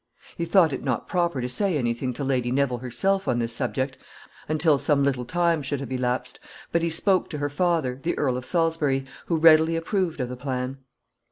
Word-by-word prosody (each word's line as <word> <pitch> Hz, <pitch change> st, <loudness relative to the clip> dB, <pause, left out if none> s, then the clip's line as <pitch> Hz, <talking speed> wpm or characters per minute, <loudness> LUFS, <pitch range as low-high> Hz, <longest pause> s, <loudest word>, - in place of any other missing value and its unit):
He 170 Hz, -, -2 dB
thought 170 Hz, -3 st, +4 dB
it 135 Hz, -, -4 dB
not 130 Hz, -4 st, -2 dB
proper 170 Hz, -7 st, 0 dB
to 125 Hz, -, -2 dB
say 180 Hz, +6 st, 0 dB
any 120 Hz, -4 st, 0 dB
thing 125 Hz, +2 st, -3 dB
to 140 Hz, -, -5 dB
Lady 125 Hz, -3 st, 0 dB
Neville 130 Hz, -2 st, +1 dB
herself 190 Hz, +11 st, 0 dB
on 120 Hz, -, +1 dB
this 115 Hz, -1 st, 0 dB
subject 130 Hz, +2 st, -2 dB, 0.5 s
until 155 Hz, -2 st, +3 dB
some 145 Hz, -2 st, +2 dB
little 130 Hz, -3 st, 0 dB
time 170 Hz, +3 st, +1 dB
should 140 Hz, 0 st, -3 dB
have 140 Hz, -, -7 dB
elapsed, 125 Hz, -1 st, -2 dB, 0.3 s
but 170 Hz, -, +2 dB
he 170 Hz, -, 0 dB
spoke 185 Hz, +3 st, +1 dB
to 150 Hz, -, -5 dB
her 145 Hz, 0 st, -2 dB
father, 155 Hz, -5 st, 0 dB
the 170 Hz, -, -2 dB
Earl 130 Hz, -4 st, +1 dB
of 125 Hz, -, -4 dB
Salisbury, 160 Hz, -4 st, 0 dB, 0.2 s
who 165 Hz, -, +1 dB
readily 160 Hz, 0 st, +6 dB
approved 170 Hz, -1 st, -1 dB
of 125 Hz, -1 st, -2 dB
the 125 Hz, -, -5 dB
plan. 130 Hz, 0 st, -4 dB
140 Hz, 205 wpm, -25 LUFS, 125-165 Hz, 0.5 s, readily